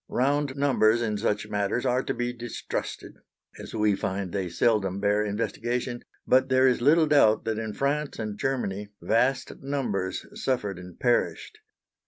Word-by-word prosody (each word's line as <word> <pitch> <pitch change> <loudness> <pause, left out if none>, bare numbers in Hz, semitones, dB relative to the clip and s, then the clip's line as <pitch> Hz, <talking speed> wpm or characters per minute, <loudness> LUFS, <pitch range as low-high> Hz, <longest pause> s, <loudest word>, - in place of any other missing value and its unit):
Round 140 +1 +1
numbers 120 -5 +3
in 110 -3 -1
such 105 -1 -1
matters 105 +4 -1
are 125 0 +2
to - - -3
be 120 0 -2
distrusted, 120 -1 -5 0.4
as - - -8
we 105 -2 +2
find 95 -1 -3
they 95 -2 -2
seldom 100 0 +1
bear 105 +1 +2
investigation; 120 +3 -2 0.2
but 130 +1 +3
there 130 0 +5
is 125 -2 +2
little 155 +5 +5
doubt 140 -8 +4
that 110 -1 -1
in 110 -1 -4
France 145 +3 -1
and 110 -2 -4
Germany 105 -5 -2
vast 130 +4 0
numbers 120 -10 -2
suffered 105 -8 -2
and 90 -1 -12
perished. 125 - 0
115 Hz, 155 wpm, -26 LUFS, 105-130 Hz, 0.4 s, there